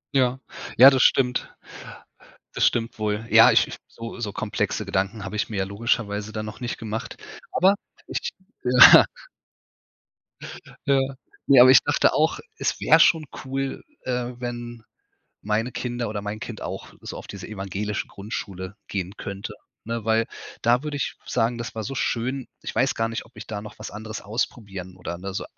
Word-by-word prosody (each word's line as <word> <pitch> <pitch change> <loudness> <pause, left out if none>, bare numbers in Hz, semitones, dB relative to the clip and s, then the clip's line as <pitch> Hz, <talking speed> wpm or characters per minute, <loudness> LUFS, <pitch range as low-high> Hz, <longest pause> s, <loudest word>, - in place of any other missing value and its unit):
Ja, 130 0 +2 0.4
ja 135 +3 +10
das 130 -2 +2
stimmt, 125 -2 +3 1.0
das - - +3
stimmt 115 -1 0
wohl. 105 0 -1
Ja, - - +8
ich - - +4
ich - - -7
so 115 +1 -9
so 105 -4 -3
komplexe 110 0 -2
Gedanken 100 +2 -2
habe 100 +2 -5
ich 105 - -1
mir 105 - -4
ja 95 - +1
logischerweise 105 0 -1
dann 110 0 -4
noch 105 - -8
nicht 120 -1 -4
gemacht. 110 0 -5 0.4
Aber 195 +3 +4 0.3
ich - - -3 0.3
Ja. 125 0 +9 1.8
Ja. 140 -1 +4 0.5
Ne, 135 -3 +8
aber 130 - +9
ich 130 - +8
dachte 145 - +3
auch, 155 +2 +2 0.2
es - - -1
wäre - - +5
schon 160 -3 +5 0.2
cool, 135 +1 -3 0.2
äh, 125 -1 -2
wenn 120 -1 -6 0.6
meine 110 +4 0
Kinder 120 -2 -3
oder 105 -1 -4
mein 105 +1 -5
Kind - - -7
auch - - -6
so - - -7
auf - - -9
diese 100 -1 -8
evangelische 100 0 -3
Grundschule 100 -2 -6
gehen 95 -2 -3
könnte, 100 -1 -6 0.3
ne, 115 -1 -4
weil 115 0 +2 0.4
da 120 +3 +3
würde 150 -1 -4
ich 140 - -2
sagen, 115 +2 0
das 120 - -6
war 110 - -3
so 135 +5 -5
schön. 125 +2 -1 0.2
Ich - - -6
weiß - - +2
gar 115 0 0
nicht, 115 - -4
ob 120 - -25
ich 105 - -9
da 105 -2 -5
noch 105 - -11
was 110 - -7
anderes 110 +2 -7
ausprobieren 100 -4 -4
oder 90 -1 -5
ne, 95 +1 -6
so - - -3
115 Hz, 175 wpm, -24 LUFS, 105-125 Hz, 1.8 s, ja